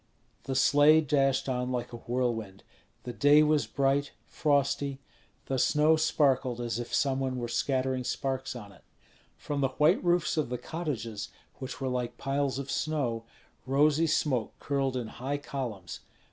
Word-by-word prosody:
The 135 Hz, -, -3 dB
sleigh 145 Hz, +4 st, +6 dB
dashed 135 Hz, -3 st, +1 dB
on 125 Hz, -1 st, -1 dB
like 120 Hz, -1 st, -3 dB
a -, -, -5 dB
whirlwind. 115 Hz, -5 st, -3 dB, 0.4 s
The 120 Hz, -, -6 dB
day 145 Hz, +3 st, +5 dB
was 150 Hz, -1 st, +2 dB
bright, 140 Hz, +1 st, 0 dB
frosty; 140 Hz, -2 st, 0 dB, 0.5 s
the 135 Hz, -1 st, -1 dB
snow 150 Hz, +4 st, +4 dB
sparkled 135 Hz, -6 st, +1 dB
as 120 Hz, -1 st, -2 dB
if 120 Hz, -, -6 dB
some 135 Hz, -1 st, +1 dB
one 130 Hz, -1 st, -2 dB
were 120 Hz, -1 st, -3 dB
scattering 130 Hz, +1 st, 0 dB
sparks 130 Hz, +1 st, -3 dB
on 105 Hz, -4 st, -9 dB
it. -, -, -19 dB, 0.5 s
From 145 Hz, -1 st, -3 dB
the 135 Hz, -, +3 dB
white 150 Hz, -, +4 dB
roofs 175 Hz, -2 st, +1 dB
of 150 Hz, -5 st, 0 dB
the 125 Hz, -, -2 dB
cottages, 115 Hz, -11 st, -4 dB, 0.3 s
which 130 Hz, -1 st, -6 dB
were 135 Hz, -, -2 dB
like 125 Hz, -2 st, -3 dB
piles 135 Hz, -1 st, -1 dB
of 140 Hz, 0 st, -5 dB
snow, 125 Hz, -8 st, -1 dB, 0.4 s
rosy 150 Hz, +4 st, +3 dB
smoke 130 Hz, -7 st, 0 dB
curled 135 Hz, -2 st, -1 dB
in 120 Hz, -, -3 dB
high 130 Hz, +6 st, -4 dB
columns. 120 Hz, -11 st, -6 dB
135 Hz, 160 wpm, -29 LUFS, 125-145 Hz, 0.5 s, sleigh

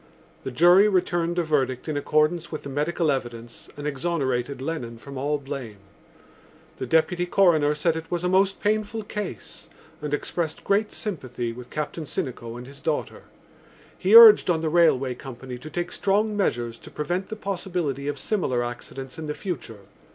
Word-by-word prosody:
The -, -, -5 dB
jury 175 Hz, +9 st, +6 dB
returned 175 Hz, -3 st, 0 dB
a 175 Hz, -, +2 dB
verdict 135 Hz, -5 st, 0 dB
in 155 Hz, -, -2 dB
accordance 155 Hz, +4 st, +1 dB
with 155 Hz, -, -5 dB
the 140 Hz, -, -6 dB
medical 150 Hz, +3 st, 0 dB
evidence 120 Hz, -3 st, -6 dB
and 145 Hz, -, -6 dB
exonerated 140 Hz, -4 st, -1 dB
Lennon 130 Hz, -5 st, -4 dB
from 140 Hz, +4 st, -10 dB
all 145 Hz, +3 st, 0 dB
blame. 135 Hz, -6 st, -7 dB, 1.0 s
The 130 Hz, -, -4 dB
Deputy 175 Hz, +4 st, +2 dB
Coroner 160 Hz, -6 st, +3 dB
said 160 Hz, +2 st, +1 dB
it 160 Hz, 0 st, -6 dB
was 175 Hz, 0 st, -2 dB
a -, -, +1 dB
most 190 Hz, +1 st, +2 dB
painful 215 Hz, +1 st, 0 dB
case, 205 Hz, -, -7 dB, 0.3 s
and 150 Hz, -1 st, -4 dB
expressed 155 Hz, +2 st, -2 dB
great 205 Hz, +2 st, +1 dB
sympathy 125 Hz, -, -4 dB
with 125 Hz, +1 st, -10 dB
Captain 155 Hz, +1 st, -4 dB
Sinico 120 Hz, -3 st, -4 dB
and 125 Hz, -, -8 dB
his 140 Hz, +1 st, -13 dB
daughter. 155 Hz, -1 st, -3 dB, 0.7 s
He -, -, +3 dB
urged 455 Hz, -, +10 dB
on 165 Hz, -2 st, +2 dB
the 160 Hz, -, 0 dB
railway 150 Hz, -6 st, +3 dB
company 125 Hz, 0 st, -9 dB
to 155 Hz, -, -9 dB
take 175 Hz, +3 st, -3 dB
strong 210 Hz, +2 st, +1 dB
measures 120 Hz, -, -1 dB
to -, -, -12 dB
prevent 175 Hz, +5 st, -3 dB
the 220 Hz, -, -4 dB
possibility 175 Hz, -9 st, -3 dB
of 145 Hz, -1 st, -2 dB
similar 135 Hz, -, -1 dB
accidents 130 Hz, +4 st, -7 dB
in 155 Hz, -, -5 dB
the 150 Hz, -, -3 dB
future. 130 Hz, -, -6 dB
150 Hz, 170 wpm, -25 LUFS, 130-175 Hz, 1.0 s, urged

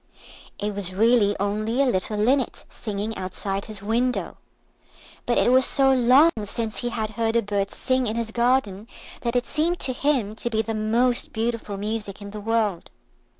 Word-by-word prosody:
It 210 Hz, +1 st, -3 dB
was 190 Hz, -2 st, -3 dB
really 220 Hz, -1 st, +4 dB
only 215 Hz, +4 st, -1 dB
a 275 Hz, -, +5 dB
little 210 Hz, -3 st, 0 dB
linnet 255 Hz, +5 st, +1 dB
singing 210 Hz, 0 st, -4 dB
outside 195 Hz, +1 st, -4 dB
his 210 Hz, -3 st, -6 dB
window, 240 Hz, +4 st, -1 dB, 0.9 s
but 240 Hz, -, +2 dB
it -, -, +4 dB
was 260 Hz, +1 st, +6 dB
so 270 Hz, 0 st, +3 dB
long 260 Hz, +6 st, +6 dB
since 220 Hz, +1 st, -3 dB
he 240 Hz, -, -2 dB
had 220 Hz, -2 st, -3 dB
heard 225 Hz, +1 st, -1 dB
a 235 Hz, -, +3 dB
bird 200 Hz, -1 st, -1 dB
sing 255 Hz, +1 st, 0 dB
in 215 Hz, -, -2 dB
his 230 Hz, -1 st, -3 dB
garden 235 Hz, -4 st, +1 dB, 0.3 s
that 235 Hz, 0 st, -2 dB
it 245 Hz, -, +1 dB
seemed 335 Hz, +3 st, 0 dB
to 255 Hz, -, -1 dB
him 250 Hz, -6 st, 0 dB
to 240 Hz, -, -3 dB
be 220 Hz, -1 st, 0 dB
the 225 Hz, -, -3 dB
most 230 Hz, +3 st, +1 dB
beautiful 225 Hz, -3 st, -2 dB
music 210 Hz, -1 st, -4 dB
in 200 Hz, -1 st, -8 dB
the 210 Hz, 0 st, -7 dB
world. 215 Hz, -4 st, 0 dB
225 Hz, 180 wpm, -24 LUFS, 205-245 Hz, 0.9 s, was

